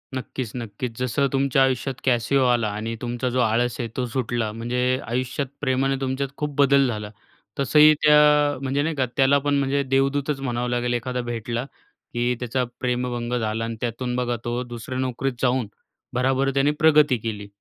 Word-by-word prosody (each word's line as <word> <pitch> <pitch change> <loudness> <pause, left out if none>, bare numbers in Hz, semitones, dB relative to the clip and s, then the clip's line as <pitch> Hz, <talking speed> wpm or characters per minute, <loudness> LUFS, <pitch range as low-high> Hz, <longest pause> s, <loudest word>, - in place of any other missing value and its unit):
नक्कीच 130 -2 -5
नक्कीच, 115 0 -5
जसं 125 +3 +1
तुमच्या 135 0 +2
आयुष्यात 130 0 0
कॅसिओ 130 +2 +2
आला 120 -3 +2
आणि 110 +2 -4
तुमचा 120 +1 -2
जो 125 +1 -1
आळस 120 +1 +1
आहे 120 -2 -3
तो 125 - 0
सुटला; 120 -2 -2
म्हणजे 115 +3 -3 0.3
आयुष्यात 130 +3 -2
प्रेमाने 135 0 +1
तुमच्यात 135 +1 -2
खूप 150 -1 -3
बदल 140 -1 +4
झाला, 105 -3 -4 0.5
तसंही 150 +3 +6
त्या 150 -1 +5
म्हणजे 135 +1 0
नाही 160 +1 -1
का, 135 -2 +1
त्याला 135 +1 +5
पण 145 0 +2
म्हणजे 140 +1 +1
देवदूतच 135 +2 0
म्हणावं 125 -2 -2
लागेल, 120 0 0
एखादा 125 +1 -2
भेटला 120 +2 -3 0.5
की 120 +1 +1
त्याचा 125 +1 -1 0.2
प्रेमभंग 125 -1 -2
झाला 110 0 -2
आणि 115 0 -4
त्यातून 125 +1 -2
बघा, 125 -1 -1
तो 120 +1 -1
दुसऱ्या 120 +1 -6
नोकरीत 130 +1 -1
जाऊन 125 -2 +1 0.5
भराभर 135 +2 +1
त्याने 140 +2 +3
प्रगती 150 -4 +5
केली. 105 -2 -5
125 Hz, 165 wpm, -23 LUFS, 120-135 Hz, 0.5 s, तसंही